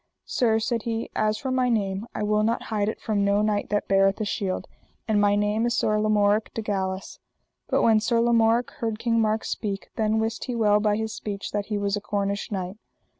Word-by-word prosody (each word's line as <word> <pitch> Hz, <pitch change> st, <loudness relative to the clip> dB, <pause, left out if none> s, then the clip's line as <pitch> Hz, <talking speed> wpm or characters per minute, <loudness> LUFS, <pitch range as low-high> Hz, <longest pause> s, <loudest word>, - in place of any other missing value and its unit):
Sir, 225 Hz, -3 st, +2 dB
said 230 Hz, +1 st, -1 dB
he, 225 Hz, 0 st, -3 dB
as 215 Hz, 0 st, +1 dB
for 260 Hz, +3 st, -3 dB
my 255 Hz, -1 st, +2 dB
name 200 Hz, -2 st, -1 dB
I -, -, -2 dB
will 210 Hz, 0 st, +2 dB
not 225 Hz, +2 st, 0 dB
hide 205 Hz, -1 st, +1 dB
it -, -, -5 dB
from 210 Hz, -3 st, 0 dB
no 200 Hz, +1 st, +2 dB
knight 210 Hz, -1 st, 0 dB
that 205 Hz, 0 st, 0 dB
beareth 195 Hz, +1 st, +3 dB
a 215 Hz, -, -1 dB
shield, 195 Hz, -2 st, -2 dB, 0.4 s
and 210 Hz, -2 st, +2 dB
my 205 Hz, 0 st, +4 dB
name 210 Hz, +2 st, +1 dB
is 235 Hz, -, 0 dB
Sir 215 Hz, 0 st, +2 dB
Lamorak 210 Hz, 0 st, +2 dB
de 225 Hz, -, -3 dB
Galis. 190 Hz, -2 st, -3 dB, 0.5 s
But -, -, +1 dB
when 220 Hz, -1 st, +5 dB
Sir 230 Hz, +2 st, +1 dB
Lamorak 230 Hz, 0 st, +3 dB
heard 225 Hz, -2 st, -3 dB
King 230 Hz, 0 st, +1 dB
Mark 220 Hz, 0 st, +1 dB
speak, 200 Hz, -2 st, -4 dB
then 220 Hz, 0 st, +1 dB
wist 225 Hz, 0 st, -2 dB
he 250 Hz, -, -3 dB
well 210 Hz, -2 st, +3 dB
by 210 Hz, -1 st, +2 dB
his 220 Hz, 0 st, -3 dB
speech 205 Hz, -1 st, -5 dB
that 205 Hz, -1 st, -2 dB
he 210 Hz, -, -1 dB
was 200 Hz, 0 st, 0 dB
a 205 Hz, -, -4 dB
Cornish 200 Hz, -1 st, -2 dB
knight. 190 Hz, 0 st, -4 dB
215 Hz, 220 wpm, -25 LUFS, 205-225 Hz, 0.5 s, when